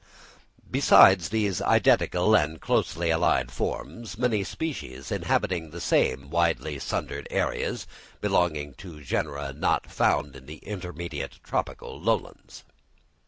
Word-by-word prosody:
Besides 95 Hz, -4 st, +6 dB
these 105 Hz, -3 st, 0 dB
identical 90 Hz, +5 st, +3 dB
and 80 Hz, -4 st, +1 dB
closely 85 Hz, +2 st, 0 dB
allied 80 Hz, +2 st, +2 dB
forms, 115 Hz, -3 st, -5 dB
many 115 Hz, -4 st, +1 dB
species 135 Hz, -, -5 dB
inhabiting 85 Hz, -4 st, 0 dB
the 85 Hz, +3 st, -8 dB
same 70 Hz, -3 st, +1 dB
widely 80 Hz, -3 st, 0 dB
sundered -, -, -4 dB
areas, -, -, -1 dB, 0.3 s
belong 75 Hz, -5 st, 0 dB
to 85 Hz, -6 st, -10 dB
genera 70 Hz, +1 st, -2 dB
not 70 Hz, -, 0 dB
now -, -, -18 dB
found 70 Hz, -1 st, +1 dB
in 65 Hz, 0 st, -13 dB
the 75 Hz, +1 st, -8 dB
intermediate 90 Hz, -4 st, -6 dB
tropical -, -, -4 dB
lowlands. -, -, -2 dB
85 Hz, 115 wpm, -26 LUFS, 75-95 Hz, 0.3 s, Besides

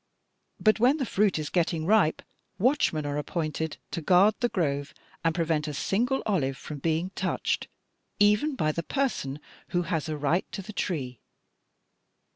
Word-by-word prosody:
But 215 Hz, 0 st, +4 dB
when 255 Hz, +6 st, +4 dB
the 270 Hz, -, -1 dB
fruit 205 Hz, -5 st, +2 dB
is 155 Hz, -1 st, -4 dB
getting 165 Hz, -2 st, 0 dB
ripe, 200 Hz, -5 st, +3 dB, 0.3 s
watchmen 200 Hz, -, +2 dB
are 145 Hz, 0 st, -1 dB
appointed 160 Hz, 0 st, -3 dB
to 170 Hz, -, -3 dB
guard 185 Hz, +6 st, +5 dB
the 240 Hz, -, +1 dB
grove 145 Hz, -7 st, -1 dB, 0.3 s
and 165 Hz, -1 st, +1 dB
prevent 160 Hz, -3 st, 0 dB
a 150 Hz, -, -4 dB
single 245 Hz, -, 0 dB
olive 135 Hz, -11 st, 0 dB
from 150 Hz, +3 st, -7 dB
being 165 Hz, +5 st, 0 dB
touched -, -, -1 dB, 0.5 s
even 210 Hz, +9 st, +4 dB
by 155 Hz, -11 st, +1 dB
the 170 Hz, -, -3 dB
person 170 Hz, -, -2 dB, 0.3 s
who 175 Hz, 0 st, 0 dB
has 165 Hz, -2 st, -2 dB
a 155 Hz, -, -2 dB
right 150 Hz, +5 st, 0 dB
to 195 Hz, -, -4 dB
the 215 Hz, -, -9 dB
tree.' 135 Hz, -, -3 dB
170 Hz, 160 wpm, -27 LUFS, 150-210 Hz, 0.5 s, guard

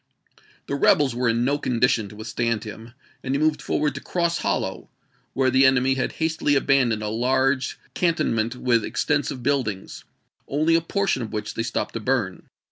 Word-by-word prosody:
The -, -, -5 dB
rebels 140 Hz, -1 st, +3 dB
were 125 Hz, 0 st, 0 dB
in 115 Hz, +1 st, +1 dB
no 140 Hz, +2 st, +1 dB
condition 115 Hz, -4 st, +1 dB
to 105 Hz, -, -12 dB
withstand 110 Hz, +1 st, -2 dB
him, 110 Hz, +2 st, -9 dB, 0.3 s
and 135 Hz, +1 st, -1 dB
he -, -, 0 dB
moved 155 Hz, 0 st, +1 dB
forward 150 Hz, -2 st, 0 dB
to 140 Hz, -, -7 dB
Cross 170 Hz, -1 st, -1 dB
Hollow, -, -, -2 dB, 0.4 s
where 130 Hz, 0 st, +2 dB
the 130 Hz, +1 st, +4 dB
enemy 130 Hz, 0 st, +4 dB
had 135 Hz, -, -2 dB
hastily 160 Hz, -2 st, 0 dB
abandoned 130 Hz, -6 st, +2 dB
a -, -, -2 dB
large 130 Hz, +3 st, +1 dB, 0.2 s
canton 170 Hz, -7 st, +1 dB
ment 115 Hz, +2 st, -1 dB
with 120 Hz, -3 st, +1 dB
extensive 140 Hz, 0 st, -1 dB
buildings, 120 Hz, -9 st, -2 dB, 0.4 s
only 155 Hz, +4 st, +1 dB
a 165 Hz, -, +4 dB
portion 195 Hz, -4 st, 0 dB
of 115 Hz, -, -5 dB
which 105 Hz, 0 st, -4 dB
they -, -, -3 dB
stopped 115 Hz, 0 st, -3 dB
to 115 Hz, -, -3 dB
burn. 110 Hz, -5 st, -2 dB
130 Hz, 180 wpm, -23 LUFS, 115-140 Hz, 0.4 s, the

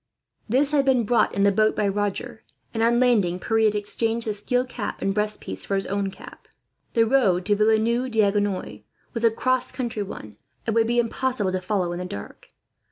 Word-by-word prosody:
This 275 Hz, +5 st, +2 dB
had 290 Hz, -2 st, +3 dB
been 260 Hz, -3 st, +3 dB
brought 235 Hz, +3 st, +2 dB
in 200 Hz, -, +2 dB
the 200 Hz, -, +5 dB
boat 215 Hz, +2 st, +2 dB
by 210 Hz, -, +1 dB
Roger, 205 Hz, +2 st, -3 dB, 0.3 s
and 225 Hz, -, -2 dB
on 235 Hz, +1 st, +3 dB
landing 210 Hz, -9 st, +3 dB
Pierre 225 Hz, +2 st, +1 dB
had 210 Hz, -1 st, +2 dB
exchanged 225 Hz, +3 st, 0 dB
the 215 Hz, -, -1 dB
steel 245 Hz, +5 st, 0 dB
cap 245 Hz, -4 st, -5 dB
and 195 Hz, -, 0 dB
breast 210 Hz, +1 st, 0 dB
piece -, -, -7 dB
for 200 Hz, -, -2 dB
his 195 Hz, -, -1 dB
own 200 Hz, 0 st, -1 dB
cap. -, -, -13 dB, 0.5 s
The 230 Hz, -1 st, +4 dB
road 205 Hz, -8 st, +2 dB
to 205 Hz, +1 st, +3 dB
Villeneuve 225 Hz, +4 st, +2 dB
D'Agenois 205 Hz, -3 st, 0 dB, 0.3 s
was 230 Hz, -2 st, -3 dB
a 230 Hz, -, +6 dB
cross 255 Hz, +3 st, 0 dB
country 240 Hz, -4 st, -3 dB
one, 110 Hz, -, -8 dB, 0.3 s
and 225 Hz, -, 0 dB
would 225 Hz, -1 st, +3 dB
be 240 Hz, +1 st, 0 dB
impossible 240 Hz, -3 st, 0 dB
to 185 Hz, 0 st, -2 dB
follow 185 Hz, -2 st, -1 dB
in 175 Hz, -, -4 dB
the 180 Hz, -, -4 dB
dark. 100 Hz, -, -9 dB
215 Hz, 205 wpm, -24 LUFS, 200-235 Hz, 0.5 s, a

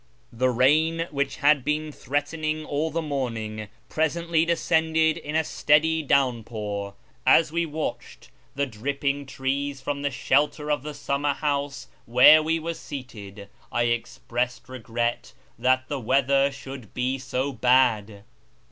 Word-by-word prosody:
The 130 Hz, +2 st, +1 dB
rain, 155 Hz, +7 st, +2 dB
which 140 Hz, -1 st, -1 dB
had 145 Hz, -1 st, +3 dB
been 150 Hz, +2 st, -1 dB
threatening 155 Hz, +3 st, -2 dB
all 150 Hz, +2 st, -1 dB
the 165 Hz, +1 st, -2 dB
morning, 115 Hz, -7 st, -3 dB, 0.2 s
presently 165 Hz, +1 st, 0 dB
descended 160 Hz, -1 st, +2 dB
in 150 Hz, -, -6 dB
a 160 Hz, -, +3 dB
steady 160 Hz, +2 st, +2 dB
downpour. 110 Hz, -7 st, -1 dB, 0.3 s
As 150 Hz, +4 st, +5 dB
we 170 Hz, 0 st, 0 dB
watched 155 Hz, +1 st, -6 dB, 0.2 s
the 140 Hz, +1 st, +1 dB
dripping 140 Hz, +4 st, -3 dB
trees 135 Hz, +1 st, -2 dB
from 140 Hz, +2 st, -3 dB
the 145 Hz, -, 0 dB
shelter 150 Hz, +3 st, +1 dB
of 145 Hz, -, 0 dB
the 150 Hz, +1 st, -7 dB
summerhouse 140 Hz, 0 st, -2 dB, 0.2 s
where 125 Hz, +6 st, +8 dB
we 160 Hz, +1 st, 0 dB
were 165 Hz, +1 st, -3 dB
seated, 105 Hz, -10 st, -9 dB, 0.2 s
I 120 Hz, -, +1 dB
expressed 120 Hz, +1 st, -2 dB
regret 120 Hz, -1 st, -3 dB, 0.3 s
that 130 Hz, +1 st, +2 dB
the 145 Hz, 0 st, -3 dB
weather 135 Hz, +3 st, +2 dB
should 135 Hz, -4 st, -10 dB
be 130 Hz, +2 st, -1 dB
so 130 Hz, +1 st, -2 dB
bad. 115 Hz, -6 st, +2 dB
140 Hz, 130 wpm, -25 LUFS, 125-150 Hz, 0.3 s, where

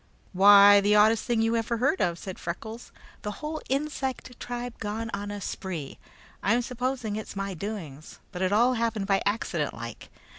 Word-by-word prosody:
"Why, 200 Hz, +1 st, +8 dB
the 205 Hz, +1 st, +3 dB
oddest 215 Hz, +1 st, +4 dB
thing 235 Hz, -3 st, +1 dB
you 225 Hz, +1 st, +1 dB
ever 230 Hz, +1 st, -1 dB
heard 275 Hz, +10 st, +1 dB
of," 170 Hz, -1 st, +1 dB
said 190 Hz, +1 st, -8 dB
Freckles; 220 Hz, +7 st, -6 dB, 0.3 s
"the 210 Hz, -, -4 dB
whole 310 Hz, +5 st, -5 dB
insect 270 Hz, -3 st, -3 dB
tribe 245 Hz, 0 st, -6 dB
gone 225 Hz, +2 st, -4 dB
on 200 Hz, 0 st, -4 dB
a 205 Hz, 0 st, -5 dB
spree. 185 Hz, -8 st, -5 dB, 0.4 s
I'm 235 Hz, +5 st, +2 dB
supposing 250 Hz, -3 st, -3 dB
it's 215 Hz, -, -7 dB
my 195 Hz, 0 st, -3 dB
doings, 165 Hz, -6 st, -7 dB
but 180 Hz, -2 st, -6 dB
it 185 Hz, 0 st, +1 dB
all 235 Hz, +5 st, +4 dB
happened 225 Hz, -4 st, -1 dB
by 195 Hz, 0 st, +2 dB
accident, 175 Hz, -7 st, -1 dB
like. 115 Hz, -1 st, -8 dB
210 Hz, 175 wpm, -27 LUFS, 195-240 Hz, 0.4 s, Why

